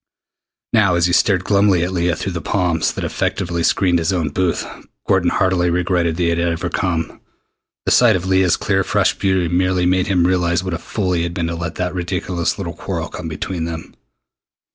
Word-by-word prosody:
Now, 100 -6 +4
as 85 0 +2
he 90 - +1
stared 95 -2 +3
glumly 100 -3 +3
at 90 - -2
Leah 85 -1 0
through 95 - -4
the 85 -2 -4
palms 85 -1 0
that - - -5
effectively 85 -2 -2
screened 90 0 +2
his 80 +3 0
own 85 -5 0
booth, 90 +3 -1 0.4
Gordon - - +3
heartily 90 -2 +1
regretted 85 -1 0
that 90 - 0
he 85 - +2
had 85 0 0
ever 85 -1 -1
come. 85 -4 -2 0.6
The - - +1
sight - - +5
of 90 0 -2
Leah's 95 -2 +3
clear - - 0
fresh - - +1
beauty 95 -3 0
merely 90 +1 +1
made 90 0 +2
him 90 -3 +2
realize 85 -1 +1
what 95 -2 -3
a 85 - -3
fool 95 +2 -2
he 85 - 0
had 85 +1 -3
been 85 -3 -1
to 85 0 -3
let 85 -1 -5
that 90 -1 -2
ridiculous 90 -1 -2
little - - -4
quarrel - - -4
come 90 - -7
between 80 +2 -4
them. 80 -1 -7
90 Hz, 205 wpm, -19 LUFS, 85-95 Hz, 0.6 s, sight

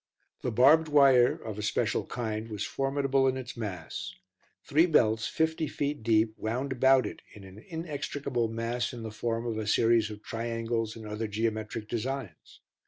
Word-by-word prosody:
The - - -1
barbed 140 +8 +5
wire, 135 -4 +6
of 110 -2 -7
a - - -2
special 105 - 0
kind, 110 -2 -4
was 105 -2 -3
formidable 135 0 +1
in 130 0 +1
its 125 -2 -7
mass; 95 -8 -5 0.5
three 160 +5 +3
belts 110 -8 +3
fifty 160 0 0
feet 145 -1 -3
deep 110 0 +2
wound 125 +5 -2
about 130 +1 +4
it - - -6
in 105 - -12
an 95 +2 -12
inextricable 145 -5 -3
mass 115 +2 -2
in 120 -2 -7
the 110 - -5
form 115 +2 -2
of 115 -2 -2
a 110 - -4
series 115 0 +3
of 105 0 -9
triangles 115 -1 -2
and 110 -1 -9
other 105 +1 -3
geometric 110 0 -2
designs. 120 - -5
115 Hz, 170 wpm, -29 LUFS, 110-135 Hz, 0.5 s, wire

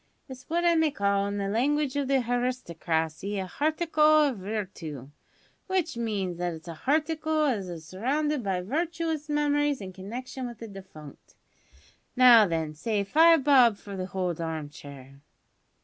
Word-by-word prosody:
It's 255 -2 -12
what 345 +2 0
I 340 - +5
may 320 -1 +3
call, 200 -6 0
in 200 0 -3
the 200 -1 -2
language 275 +6 0
of 285 -2 -1
the 270 -1 +2
haristocracy, 200 -7 -2
a 190 - -2
harticle 310 - +3
of 230 - -8
virtoo, 185 - -6 0.6
w'ich 375 -7 0
means 200 -7 -3
that 175 -1 -2
it's 160 +2 -13
a 170 - -5
harticle 310 - 0
as 195 -3 -6
is 165 -2 -8
surrounded 275 - -1
by 190 -4 -1
virtuous 320 - -2
memories 290 -1 +1
in 190 -2 -8
connection 245 +7 -6
with 240 -2 -9
the 230 - -8
defunct. 190 -8 -13 0.8
Now 245 -4 +8
then, 160 -3 -2
say 205 +6 -1
five 320 +7 +5
bob 255 -6 +5
for 200 -1 -9
the 185 -1 -4
hold 180 -3 -3
harm 160 -3 -4
chair!" 140 -2 -12
225 Hz, 160 wpm, -27 LUFS, 185-290 Hz, 0.8 s, Now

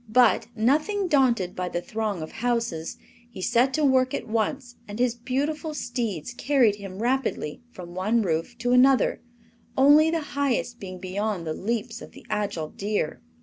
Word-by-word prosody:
But, 250 +3 +4
nothing 305 - +1
daunted 245 - +2
by 180 0 -2
the 175 - -2
throng 210 -2 -3
of 155 - -8
houses, 230 -9 -2 0.3
he 240 - -11
set 240 +7 +2
to 310 -1 +2
work 260 -1 +3
at - - -5
once 240 +3 -2
and 205 0 -7
his 245 -1 +2
beautiful 285 +6 -2
steeds 235 - -3
carried 240 -5 +2
him 195 +1 -7
rapidly 250 - -1
from 175 -6 -10
one 215 +5 +1
roof 165 +6 -2
to 245 +1 -1
another, 255 +1 +4 0.6
only 295 +4 +6
the 330 0 0
highest 255 -3 -1
being 185 -2 -7
beyond 190 0 -3
the 155 - -2
leaps 225 +5 -3
of - - -11
the - - -14
agile 200 -7 -2
deer. 200 -5 -2
235 Hz, 165 wpm, -25 LUFS, 195-260 Hz, 0.6 s, only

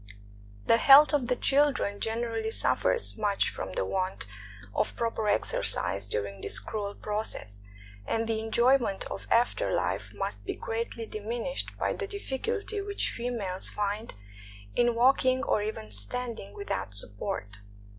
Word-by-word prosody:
The 230 - +5
health 285 +5 +8
of 275 -5 +2
the 250 - +2
children 270 -8 +2
generally 225 0 -2
suffers 465 - +2
much 205 -2 +1
from 95 0 -6
the 95 - -1
want 185 - -2 0.5
of - - 0
proper 225 -2 -1
exercise 100 - +2
during 100 -1 -3
this - - +2
cruel 205 -2 -3
process; 210 - -3 0.5
and 225 0 0
the 225 -1 0
enjoyment 235 -1 +2
of - - -6
after 245 - +2
fife - - -2
must - - -4
be - - -4
greatly 230 0 -4
diminished 230 +5 -4
by - - 0
the 410 - -4
difficulty 405 - -3
which 405 0 -1
females 225 -6 0
find 210 - -3 0.6
in 240 -1 +3
walking 255 +1 +4
or 210 - +1
even 205 - -5
standing 210 - -2
without 250 - -4
support. 100 0 -4
225 Hz, 135 wpm, -29 LUFS, 200-255 Hz, 0.6 s, health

